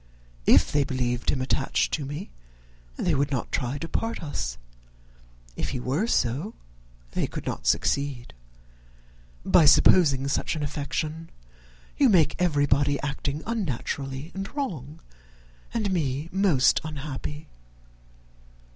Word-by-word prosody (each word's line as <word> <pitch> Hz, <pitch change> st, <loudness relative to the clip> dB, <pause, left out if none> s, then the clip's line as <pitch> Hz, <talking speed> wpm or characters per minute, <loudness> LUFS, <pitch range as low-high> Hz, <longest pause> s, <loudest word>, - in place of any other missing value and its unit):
If -, -, +6 dB
they 145 Hz, -1 st, +3 dB
believed 125 Hz, -3 st, -1 dB
him 130 Hz, -2 st, +1 dB
attached 135 Hz, +1 st, 0 dB
to 145 Hz, -4 st, -1 dB
me 150 Hz, +8 st, -6 dB, 0.6 s
they 170 Hz, -, 0 dB
would 140 Hz, 0 st, +1 dB
not 130 Hz, -5 st, -3 dB
try 130 Hz, 0 st, -1 dB
to 165 Hz, -, -5 dB
part 225 Hz, +2 st, -3 dB
us; -, -, -3 dB, 1.0 s
if -, -, -2 dB
he -, -, -3 dB
were 140 Hz, -, 0 dB
so, 145 Hz, -, 0 dB, 0.6 s
they -, -, -1 dB
could -, -, -7 dB
not -, -, -4 dB
succeed. 140 Hz, -4 st, 0 dB, 1.1 s
By 170 Hz, -, +6 dB
supposing 140 Hz, -2 st, +6 dB
such 140 Hz, -, -1 dB
an 155 Hz, -, -3 dB
affection, 155 Hz, +2 st, -3 dB, 0.7 s
you 275 Hz, -3 st, +5 dB
make 175 Hz, -7 st, +4 dB
everybody 145 Hz, -4 st, +2 dB
acting 145 Hz, +1 st, -3 dB
unnaturally 145 Hz, -, -3 dB
and 195 Hz, +1 st, -5 dB
wrong, 160 Hz, -, -4 dB, 0.7 s
and 215 Hz, -4 st, -1 dB
me 145 Hz, -2 st, -1 dB
most 185 Hz, -9 st, +3 dB
unhappy. 150 Hz, 0 st, -6 dB
145 Hz, 120 wpm, -26 LUFS, 135-170 Hz, 1.1 s, If